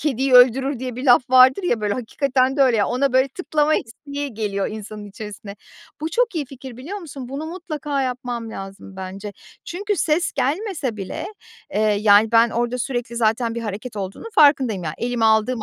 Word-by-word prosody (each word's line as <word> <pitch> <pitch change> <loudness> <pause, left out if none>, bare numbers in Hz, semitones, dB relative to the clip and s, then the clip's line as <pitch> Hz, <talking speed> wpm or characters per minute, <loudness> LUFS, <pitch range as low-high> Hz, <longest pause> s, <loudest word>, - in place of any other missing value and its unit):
kediyi 270 -2 0
öldürür." 255 +2 +5
diye 250 -1 -5
bir 255 - -5
laf 250 0 +4
vardır 260 +8 +6
ya, 240 -11 0
böyle, 205 -1 0
hakikaten 260 +2 0
de 275 - +5
öyle, 250 -3 +4
ya, 205 - +2
ona, 255 +1 0
böyle, 260 +1 +3
tıklama 305 0 0
isteği 280 +3 -5
geliyor 200 -2 -2
insanın 215 0 -8
içerisine. 205 0 -9 0.4
Bu 315 - -2
çok 470 +3 +1
iyi 315 -3 -1
fikir, 260 -2 -10
biliyor 320 +12 -6
musun? 285 -8 -9
Bunu 280 +4 -5
mutlaka 305 -5 -3
yapmam 245 -3 -4
lazım 195 -1 -9
bence. 190 +2 -7 0.3
Çünkü 405 +4 -3
ses 335 +1 +1
gelmese 290 - -2
bile, 195 -2 -5 0.5
eee, 210 - +1
yani, 210 +1 +4
ben 230 0 +5
orada 240 +2 -1
sürekli 245 -2 -3
zaten 230 +1 +1
bir 235 - -3
hareket 215 +2 -6
olduğunu 195 - -6
farkındayım. 265 - +4
Ya, 155 - -3
elime 240 -1 -1
aldığım 220 +1 +2
250 Hz, 180 wpm, -21 LUFS, 220-280 Hz, 0.5 s, vardır